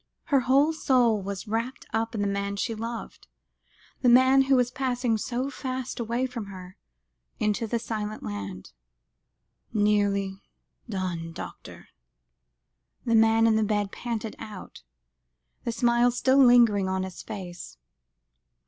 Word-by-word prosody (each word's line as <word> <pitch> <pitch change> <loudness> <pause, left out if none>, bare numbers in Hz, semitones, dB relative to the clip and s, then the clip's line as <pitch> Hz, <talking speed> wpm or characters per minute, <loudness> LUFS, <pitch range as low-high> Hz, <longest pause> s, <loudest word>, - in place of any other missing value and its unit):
Her 280 -4 +3
whole 275 +5 +3
soul 245 -8 +2
was 195 0 -6
wrapped 230 +5 -3
up 225 +1 -1
in 210 - -1
the 205 - +1
man 200 0 -2
she 225 +3 -2
loved, 230 +1 -7 0.7
the 250 - +4
man 260 +2 +6
who 270 0 +4
was 250 -1 +2
passing 250 -3 0
so 250 +5 -2
fast 260 -2 -5
away 235 +2 -1
from 240 -5 -6
her, 185 -2 -10 0.6
into 215 +2 0
the 235 - 0
silent 215 -2 -4
land. 100 -4 -6 1.0
"Nearly 205 -2 +1 0.5
done 175 -5 -3
doctor," - - -10 1.2
the 230 - +1
man 225 0 +5
in 220 -1 +4
the 220 - +2
bed 205 -1 0
panted 225 -2 -4
out, 205 - -9 0.8
the 235 - 0
smile 240 +1 +3
still 260 +3 +4
lingering 230 -6 +5
on 190 0 -1
his 190 -1 -7
face. 180 - -8
225 Hz, 135 wpm, -26 LUFS, 200-245 Hz, 1.2 s, man